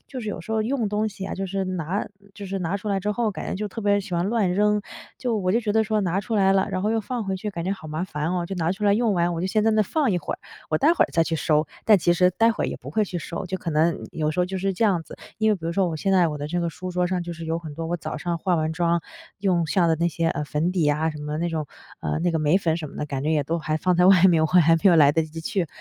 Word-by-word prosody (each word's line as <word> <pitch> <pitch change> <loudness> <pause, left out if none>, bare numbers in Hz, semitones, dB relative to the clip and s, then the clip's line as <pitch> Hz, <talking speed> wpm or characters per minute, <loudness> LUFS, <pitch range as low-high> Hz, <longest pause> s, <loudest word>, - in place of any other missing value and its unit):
就 260 - -7
是 215 - -5
有 205 - -4
时 220 - -6
候 220 -1 +1
用 235 -2 -1
东 210 +1 0
西 195 -2 -8
啊， - - -4
就 195 +1 -3
是 195 +1 -2
拿 185 +1 -2 0.3
就 205 - -8
是 195 +1 -3
拿 180 +3 -1
出 205 +2 -6
来 195 -1 0
之 210 +2 -1
后， 225 0 0
感 - - -6
觉 - - -2
就 210 +1 -3
特 225 - -7
别 205 -1 +2
喜 195 -2 -6
欢 170 +1 +1
乱 205 -4 +1
扔， 210 +1 +2 0.4
就 240 -3 -1
我 185 -3 0
就 230 - +2
觉 210 -2 -1
得 220 - +3
说： 215 0 0
“拿 185 +1 0
出 215 +3 -4
来 195 -1 +4
了 195 -1 +2
然 185 - -2
后 210 - +1
又 225 0 +1
放 230 +1 -4
回 190 -1 -2
去， 210 +3 -4
感 170 -4 -5
觉 190 - 0
好 160 -5 -8
麻 155 +4 -2
烦 155 -1 -3
哦， 175 -1 -1
就 195 - -5
拿 165 -1 0
出 210 +2 -5
来 200 - +5
用 225 0 +2
完， 175 0 +1
我 165 - -3
就 185 - -1
先 215 +2 +1
在 225 - +4
那 215 - +4
放 275 +4 0
一 175 - +1
会 - - -4
儿， - - -17 0.3
我 155 - +2
待 320 - +4
会 - - +4
儿 - - -7
再 165 -1 +3
去 165 - -2
收。” 150 0 +1 0.2
但 210 -3 +6
其 175 +1 +3
实 180 +1 +4
待 230 +5 +3
会 - - -3
儿 - - 0
也 - - -4
不 - - -11
会 215 -1 +1
去 180 -2 -5
收， 170 +4 -5
就 190 +1 -3
可 170 - -4
能 160 +2 +1
有 155 -1 -1
时 155 - -6
候 180 - +2
就 190 +1 -4
是 195 +1 0
这 225 - 0
样 185 -6 +2
子。 - - -12 0.2
因 220 0 +3
为 210 - +4
比 165 - -11
如 170 - -1
说 190 0 +1
我 160 - -3
现 195 +5 0
在 180 -3 +4
我 150 - -4
的 145 - -4
这 175 +2 -1
个 170 - 0
书 180 +4 -7
桌 180 0 0
上 180 -1 -1
就 175 - -5
是 165 0 -8
有 165 +1 -1
很 155 -3 -8
多， 165 +1 -4
我 175 - -1
早 160 - -5
上 170 +2 -2
化 180 +2 +1
完 155 0 -1
妆 170 0 +1 0.4
用 180 -5 +1
下 175 +1 +2
的 160 - +2
那 170 +2 +1
些， 165 0 -1
呃， 150 - -2
粉 150 +4 -1
底 180 - 0
呀， 150 +1 +2
什 150 - -8
么 150 0 -5
的 150 - -2
那 170 +1 -1
种 155 -3 -3 0.3
呃， - - -2
那 175 +1 +1
个 160 - 0
眉 155 +3 +3
粉 165 -4 0
什 160 -3 -5
么 - - -12
的， 150 - -3
感 135 -2 -4
觉 155 - 0
也 150 -2 +2
都 165 +4 -1
还 155 -1 -1
放 180 +2 +1
在 180 +1 +5
外 190 -1 +6
面， 165 -4 +5
我 - - +4
还 165 -1 +5
没 160 - -5
有 175 - +6
来 145 -2 +6
得 160 - +2
及 155 +1 -7
去 170 +2 -1
180 Hz, 370 characters per minute, -24 LUFS, 165-200 Hz, 0.4 s, 但